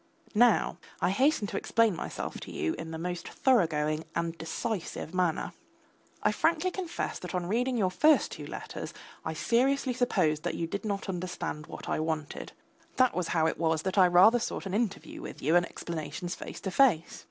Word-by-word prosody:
Now 235 Hz, 0 st, +4 dB, 0.2 s
I -, -, +2 dB
hasten 265 Hz, +2 st, +3 dB
to -, -, -3 dB
explain 230 Hz, -4 st, +2 dB
myself -, -, -5 dB
to -, -, -9 dB
you 80 Hz, -, -1 dB
in 165 Hz, -, -6 dB
the 160 Hz, -, -5 dB
most 175 Hz, +1 st, -4 dB
thoroughgoing 160 Hz, -, +2 dB
and 170 Hz, 0 st, -1 dB
decisive 170 Hz, +1 st, -4 dB
manner. 180 Hz, -3 st, 0 dB, 0.7 s
I -, -, +4 dB
frankly 335 Hz, +3 st, +1 dB
confess 350 Hz, -2 st, -3 dB
that -, -, -6 dB
on 180 Hz, -1 st, -1 dB
reading 245 Hz, +6 st, 0 dB
your 190 Hz, -4 st, +2 dB
first 300 Hz, +10 st, +4 dB
two -, -, -7 dB
letters -, -, -6 dB, 0.3 s
I 160 Hz, -, -3 dB
seriously 260 Hz, -, +2 dB
supposed 180 Hz, -11 st, +1 dB
that 175 Hz, -, -2 dB
you 165 Hz, -, -1 dB
did 200 Hz, +6 st, -4 dB
not 200 Hz, -1 st, -2 dB
understand 180 Hz, -4 st, -4 dB
what -, -, -8 dB
I -, -, 0 dB
wanted; 155 Hz, -2 st, -3 dB, 0.4 s
that 255 Hz, -1 st, +4 dB
was 180 Hz, -2 st, -1 dB
how 160 Hz, -2 st, +2 dB
it 160 Hz, -, 0 dB
was 160 Hz, -1 st, +1 dB
that 190 Hz, +1 st, +1 dB
I 185 Hz, -, +8 dB
rather 185 Hz, +7 st, +6 dB
sought 225 Hz, -, -3 dB
an 190 Hz, -, -4 dB
interview 210 Hz, -2 st, -2 dB
with -, -, -8 dB
you 155 Hz, +5 st, +2 dB
and 175 Hz, 0 st, +4 dB
explanations 170 Hz, +1 st, -5 dB
face -, -, -7 dB
to 190 Hz, -, -3 dB
face. 205 Hz, -8 st, +3 dB
185 Hz, 185 wpm, -29 LUFS, 165-235 Hz, 0.7 s, I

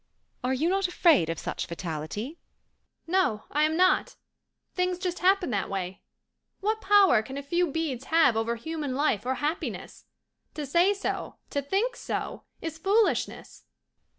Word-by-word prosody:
Are 250 Hz, -, 0 dB
you 270 Hz, +5 st, +1 dB
not 385 Hz, +1 st, +2 dB
afraid 325 Hz, -, +4 dB
of 165 Hz, -, -2 dB
such -, -, -4 dB
fatality?" 170 Hz, -, -5 dB, 0.7 s
"No, 335 Hz, -, +1 dB
I 300 Hz, +1 st, +3 dB
am 315 Hz, +1 st, 0 dB
not. 370 Hz, +1 st, +3 dB, 0.6 s
Things 360 Hz, -1 st, 0 dB
just 360 Hz, -1 st, -3 dB
happen 375 Hz, -4 st, +3 dB
that 200 Hz, -3 st, -1 dB
way. 190 Hz, -1 st, -4 dB, 0.6 s
What 435 Hz, +2 st, -1 dB
power 385 Hz, -, +5 dB
can 265 Hz, +5 st, -8 dB
a 280 Hz, -, -5 dB
few 345 Hz, +5 st, +1 dB
beads 280 Hz, -4 st, -3 dB
have 320 Hz, -7 st, +4 dB
over 225 Hz, +1 st, 0 dB
human 290 Hz, +2 st, -4 dB
life 255 Hz, -6 st, +1 dB
or 260 Hz, -, +1 dB
happiness? 300 Hz, +6 st, -4 dB, 0.5 s
To 300 Hz, -, -3 dB
say 345 Hz, +8 st, +3 dB
so, 400 Hz, -, -3 dB, 0.2 s
to 285 Hz, -, 0 dB
think 390 Hz, -, 0 dB
so, -, -, -4 dB, 0.2 s
is 325 Hz, -1 st, -5 dB
foolishness." 410 Hz, +5 st, 0 dB
310 Hz, 150 wpm, -27 LUFS, 250-365 Hz, 0.7 s, power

